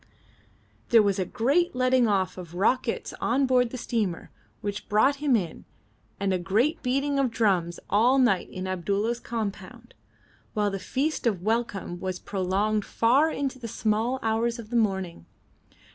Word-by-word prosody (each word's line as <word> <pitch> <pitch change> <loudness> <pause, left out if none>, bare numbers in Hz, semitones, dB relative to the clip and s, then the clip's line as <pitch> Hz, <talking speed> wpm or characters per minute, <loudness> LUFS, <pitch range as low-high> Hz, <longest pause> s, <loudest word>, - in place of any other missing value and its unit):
There 230 -2 +6
was 200 -1 +1
a 185 - 0
great 280 - +1
letting 255 -1 +3
off 190 -3 0
of 175 -2 -9
rockets 230 +5 0
on 265 +4 +2
board 250 -2 +3
the 255 - -6
steamer 215 -8 -2 0.3
which 205 0 -5
brought 265 +7 +3
him 285 -3 +2
in, 175 -7 -3 0.6
and 195 -1 0
a 185 - 0
great 220 - +1
beating 275 +2 0
of 270 -2 +2
drums 190 -7 0
all 240 +6 +4
night 240 -8 +2
in 185 0 -6
Abdulla's 200 +6 -1
compound, 220 -5 -6 0.6
while 210 -1 +1
the 195 - -3
feast 270 +7 -1
of 190 -6 -1
welcome 210 -5 -2
was 185 0 -3
prolonged 200 +3 -1
far 260 +11 +3
into 275 -4 -3
the 235 - -6
small 225 +4 0
hours 230 +2 0
of 230 -1 -10
the - - -2
morning. 190 - -1
220 Hz, 160 wpm, -26 LUFS, 195-250 Hz, 0.6 s, There